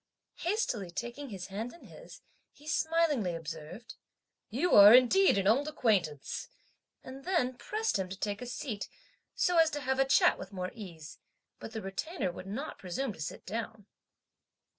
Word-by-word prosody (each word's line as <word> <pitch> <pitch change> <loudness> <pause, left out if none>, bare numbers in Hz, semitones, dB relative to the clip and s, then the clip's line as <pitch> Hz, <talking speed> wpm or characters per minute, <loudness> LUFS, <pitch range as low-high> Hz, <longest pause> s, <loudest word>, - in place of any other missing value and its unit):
Hastily 335 - -1
taking 240 +9 -6
his 190 -4 -6
hand 220 +5 -5
in 340 - -16
his, - - -13 0.3
he 295 +2 -18
smilingly 310 - +1
observed, 165 +6 -8 0.6
"You 360 - 0
are, 205 +3 +10
indeed, 255 - +5
an 195 - 0
old 255 +9 +3
acquaintance!" 195 - -1 0.5
and 265 +1 -10
then 335 -9 +1
pressed 430 - -1
him 185 -1 -3
to 190 - -6
take 205 +1 -3
a 245 - -6
seat, 240 -4 -5 0.5
so 360 -2 +2
as 325 -1 +6
to 290 -2 -4
have 265 0 -1
a 270 - +5
chat 270 - +4
with 190 - -8
more 185 -2 -4
ease, 170 -9 -10 0.4
but 225 - -8
the 220 -3 -5
Retainer 195 - -3
would 185 +2 -9
not 255 +10 -5
presume 215 +7 -3
to 160 - -11
sit 150 - -6
down. 220 0 -5
230 Hz, 165 wpm, -31 LUFS, 190-290 Hz, 0.6 s, are